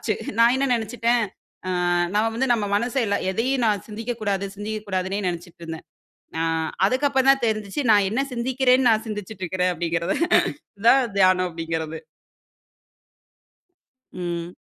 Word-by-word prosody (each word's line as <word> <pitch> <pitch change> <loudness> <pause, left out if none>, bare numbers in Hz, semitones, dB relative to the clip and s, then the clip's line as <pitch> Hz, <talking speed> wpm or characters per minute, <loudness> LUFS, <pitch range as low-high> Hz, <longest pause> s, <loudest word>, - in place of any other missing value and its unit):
ஆச்சு. 215 - 0 0.3
நான் 235 +2 +6
என்ன 275 +1 0
நினைத்துட்டேன். 235 +1 0 0.5
ஆ - - -1 0.4
நான் 215 +2 +2
வந்து 265 - +1
நம்ம 215 -3 -1
மனச 240 +5 -2 0.2
ந - - +2
எதையும் 250 +5 0
நான் 210 -2 0
சிந்திக்க 225 +3 -4
கூடாது, 200 -1 -1
சிந்திக்க 215 +1 -4
கூடாதுனே 190 +1 -1
நினச்சிட்டுருந்தேன். 170 -2 -7 0.5
ஆ - - +2 0.4
அதுக்கு 260 +6 +1
அப்புறம் 270 0 +4
தான் 270 -3 -1
தெரிஞ்சிச்சி 215 +4 -2
நான் 205 -2 +4
என்ன 250 - +1
சிந்திக்கிறேன்னு 255 +1 +2
நான் 220 0 +2
சிந்திச்சிட்டு 210 -2 -6
இருக்கிறேன் 180 0 0
அப்டிங்கிறது. 170 0 -1 0.6
இது - - -12
தான் 270 +2 +6 0.2
தியானம் 185 -1 +4
அப்டிங்கறது. 165 -1 -4 2.1
ம். 175 -1 -5
210 Hz, 140 wpm, -23 LUFS, 180-240 Hz, 2.1 s, நான்